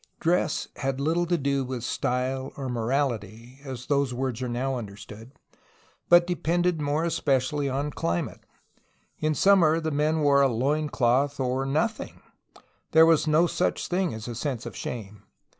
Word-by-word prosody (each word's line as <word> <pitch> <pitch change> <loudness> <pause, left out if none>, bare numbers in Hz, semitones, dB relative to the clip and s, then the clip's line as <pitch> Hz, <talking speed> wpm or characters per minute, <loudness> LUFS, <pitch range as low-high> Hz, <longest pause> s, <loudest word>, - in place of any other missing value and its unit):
Dress 170 -1 0
had 135 -1 -2
Httle 165 +5 0
to 175 - +2
do 140 -2 0
with 125 -2 -5
style 130 +2 -2
or 135 -2 -4
morality, 120 -1 -2
as 130 -3 -7
those 140 -3 0
words 130 -2 -3
are 125 - -2
now 130 +3 -1
understood, 105 +2 -9 0.8
but 175 0 +7
depended 175 -1 0
more 145 +2 0
especially 145 -3 0
on 140 +3 -2
climate. 85 -9 -3 0.8
In 155 0 0
summer 170 -5 +4
the 160 -1 -2
men 155 +2 +1
wore 140 -1 +4
a 140 - +5
loin 145 +6 0
cloth 135 +3 +1
or 130 +1 -1
nothing; 220 +11 -2 0.7
there 160 0 +8
was 165 -1 +3
no 155 +3 +4
such 175 +1 -1
thing 180 -1 0
as 110 0 -7
a 120 - -4
sense 125 0 -4
of - - -7
shame. 105 -4 -6
140 Hz, 160 wpm, -26 LUFS, 125-155 Hz, 0.8 s, there